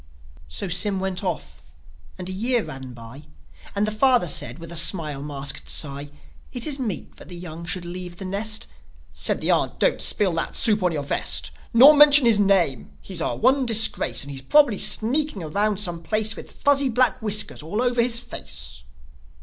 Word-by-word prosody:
So 80 - -3
Sym 190 +3 +1
went 190 0 -3
off; 180 -4 -5 0.6
and 180 -1 -7
a - - -4
year 230 +4 0
ran 130 -1 -9
by, 120 +5 -13 0.5
And 200 +1 +1
the 215 - -1
father 245 -2 +2
said, 150 - 0
with 165 -1 -11
a - - -5
smile 155 -4 +1
masked 140 -1 -6
sigh, 140 -1 -3 0.4
"It 245 -3 -4
is 290 -3 -2
meet 220 -8 -6
that - - -12
the 175 - -9
young 170 -1 -9
should 180 0 -3
leave 175 0 -7
the 190 - -7
nest." 215 +4 -2 0.5
Said - - 0
the - - +2
aunt, - - 0
"Don't - - +1
spill 200 -5 +1
that 165 - -4
soup 215 -3 +2
on 180 -1 +1
your 150 -3 -3
vest! 140 - -1 0.2
Nor 265 +6 +8
mention 295 -2 +7
his 225 -3 +4
name! 190 - 0
He's 185 -4 -8
our - - -2
one 260 +2 +2
disgrace! 225 -7 +1
And 140 - -7
he's 135 -1 -7
probably 245 - +3
sneaking 250 - +2
around 200 +6 -1
some 175 -4 -1
place 215 +3 0
With - - -10
fuzzy 280 -1 +2
black 255 +1 +2
whiskers 210 -5 0
all 165 +8 -5
over 245 -1 +1
his 235 0 +1
face." 70 - -7
195 Hz, 190 wpm, -22 LUFS, 165-235 Hz, 0.6 s, Nor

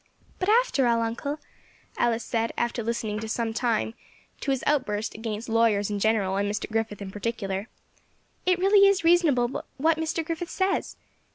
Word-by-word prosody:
"But, 370 - 0
after 440 - +3
all, 230 -1 +2
uncle," 235 +6 -3 0.6
Alice 235 -1 +1
said, 230 0 -1
after 235 0 -1
listening 220 -2 -2
for 220 - -5
some 225 0 -1
time 225 -1 0 0.5
to - - -4
his 270 -2 0
outburst 225 -7 0
against 220 0 -5
lawyers 225 -3 +2
in 205 - -1
general, 200 -3 +1
and 200 0 0
Mr. 210 - -3
Griffith 220 -2 -2
in 190 - -7
particular, 205 -1 -3 0.8
"it 365 -1 +3
really 395 +2 +6
is 395 -3 +2
reasonable 305 -8 +3
what 315 +3 +2
Mr. 320 0 -1
Griffith 335 +2 -4
says. 380 0 -1
235 Hz, 165 wpm, -26 LUFS, 220-315 Hz, 0.8 s, really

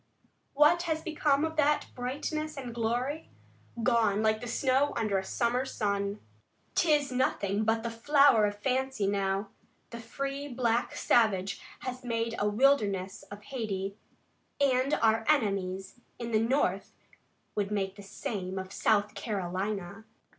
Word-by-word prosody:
What 300 +4 +5
has 315 0 -1
become 300 -3 +1
of 320 0 -5
that 295 0 +3
brightness 295 +5 -3
and 250 -3 -6
glory? 245 +7 -2 0.5
Gone 220 -4 +3
like 220 +2 +1
snow 265 +4 +1
under 215 -4 +1
a - - -5
summer 240 +5 0
sun. 200 -5 -2 0.5
'Tis 295 -4 +2
nothing 215 -5 0
but 225 0 +1
the 235 - -2
flower 255 -2 +5
of 205 0 -5
fancy 260 0 -1
now. 195 0 0 0.4
The 235 - -7
free 275 +5 -4
black 240 -3 0
savage 200 -4 +2 0.2
has 255 -1 -5
made 230 -1 -1
a 210 - +2
wilderness 205 -6 +2
of 205 0 -10
Hayti, 200 -7 -4 0.6
and 270 0 +3
our 225 0 +4
enemies 195 -7 0 0.2
in 235 -1 -5
the 215 - +3
North 260 +6 0 0.6
would 205 -2 -1
make 195 -2 -2
the 205 - -11
same 195 -1 -5
of 190 +1 -5
South 210 -1 +2
Carolina." 195 0 -3
230 Hz, 135 wpm, -30 LUFS, 200-265 Hz, 0.6 s, What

